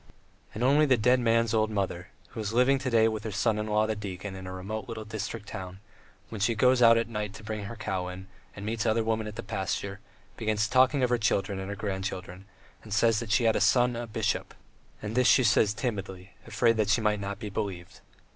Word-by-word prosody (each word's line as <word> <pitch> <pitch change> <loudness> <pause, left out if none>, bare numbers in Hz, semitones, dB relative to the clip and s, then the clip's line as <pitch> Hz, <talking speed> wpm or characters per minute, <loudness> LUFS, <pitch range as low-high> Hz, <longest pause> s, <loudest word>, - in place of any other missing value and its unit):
And 110 - -2
only 145 +4 +4
the 130 -2 +4
dead 125 +3 +3
man's 115 -1 +2
old 110 -1 +2
mother, 95 -4 -3 0.2
who - - -9
is 105 0 -3
living 130 +3 +4
to 130 0 -2
day 115 -2 +4
with 110 -1 -3
her 110 - -4
son 105 +1 0
in 105 - -3
law 105 0 +2
the 110 0 -1
deacon 100 -1 -6
in 95 -1 -8
a - - -6
remote 100 +3 -5
little 110 -2 -6
district 105 0 -5
town, 95 0 -7 0.5
when 110 -3 -6
she 115 +3 +2
goes 125 +3 +4
out 115 -1 +7
at 115 -1 0
night 105 -2 -4
to 110 - -11
bring 110 -1 -5
her 115 +3 -7
cow 95 -4 -3
in 90 +1 -8 0.3
and 100 - -7
meets 110 +1 -1
other 110 +1 +2
women 110 -1 -1
at 105 - -7
the 115 - -6
pasture, 100 0 -3 0.4
begins 110 -1 0
talking 130 +3 +3
of 125 - +1
her 120 - +2
children 100 -2 0
and 95 +1 -5
her 100 - -4
grandchildren, 95 -2 -5 0.4
and 105 -2 -5
says 115 -1 +3
that 115 -3 -5
she 115 - +3
had 115 -1 +3
a - - 0
son 125 -1 +3
a 120 0 -4
bishop, 110 0 -2 0.5
and 105 +1 -4
this 125 +1 +3
she 130 - +5
says 105 -2 +4
timidly, 100 -4 -5
afraid 115 +1 +2
that 105 -1 +1
she 105 - +4
may 105 -1 +2
not 100 -1 -5
be 105 -1 -7
believed. 95 -5 -5
110 Hz, 235 wpm, -28 LUFS, 100-115 Hz, 0.5 s, out